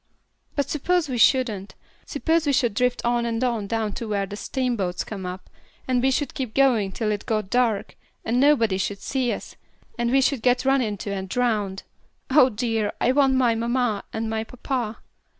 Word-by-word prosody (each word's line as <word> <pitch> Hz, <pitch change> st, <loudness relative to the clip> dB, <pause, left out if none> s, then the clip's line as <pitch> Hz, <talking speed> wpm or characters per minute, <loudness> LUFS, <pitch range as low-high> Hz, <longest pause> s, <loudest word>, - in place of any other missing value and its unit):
"But 285 Hz, -2 st, 0 dB
suppose 345 Hz, +3 st, 0 dB
we 245 Hz, -2 st, -2 dB
shouldn't. 220 Hz, -6 st, +2 dB, 0.3 s
Suppose 320 Hz, +2 st, 0 dB
we 285 Hz, -, +3 dB
should 240 Hz, -5 st, +2 dB
drift 250 Hz, +3 st, 0 dB
on 240 Hz, 0 st, +2 dB
and 230 Hz, +1 st, -1 dB
on 230 Hz, -5 st, -1 dB
down 220 Hz, -1 st, -1 dB
to 230 Hz, -, -5 dB
where 200 Hz, -2 st, 0 dB
the 200 Hz, -, -7 dB
steamboats 225 Hz, -7 st, -2 dB
come 195 Hz, -4 st, -6 dB
up, 180 Hz, +1 st, -7 dB, 0.4 s
and 255 Hz, -1 st, +2 dB
we 265 Hz, -, +3 dB
should 280 Hz, +2 st, -1 dB
keep 255 Hz, -5 st, -4 dB
going 240 Hz, -8 st, +3 dB
till 215 Hz, +2 st, -1 dB
it 205 Hz, -1 st, -4 dB
got 215 Hz, -3 st, -1 dB
dark, 240 Hz, -5 st, +1 dB, 0.3 s
and 235 Hz, +2 st, +1 dB
nobody 230 Hz, -9 st, +3 dB
should 200 Hz, +1 st, -2 dB
see 255 Hz, 0 st, -1 dB
us, -, -, -6 dB, 0.4 s
and 240 Hz, 0 st, +1 dB
we 270 Hz, +2 st, +4 dB
should 265 Hz, -2 st, +1 dB
get 250 Hz, +2 st, +2 dB
run 270 Hz, 0 st, +4 dB
into 205 Hz, -3 st, -3 dB
and 190 Hz, -1 st, -5 dB
drowned. 210 Hz, -5 st, 0 dB, 0.5 s
Oh 265 Hz, -2 st, +6 dB
dear! 225 Hz, -2 st, -1 dB
I 245 Hz, -, +3 dB
want 270 Hz, -1 st, +3 dB
my 250 Hz, -3 st, +3 dB
mamma, 235 Hz, -2 st, 0 dB
and 220 Hz, 0 st, -3 dB
my 220 Hz, 0 st, -2 dB
papa." 245 Hz, -1 st, -4 dB
235 Hz, 190 wpm, -24 LUFS, 210-260 Hz, 0.5 s, Oh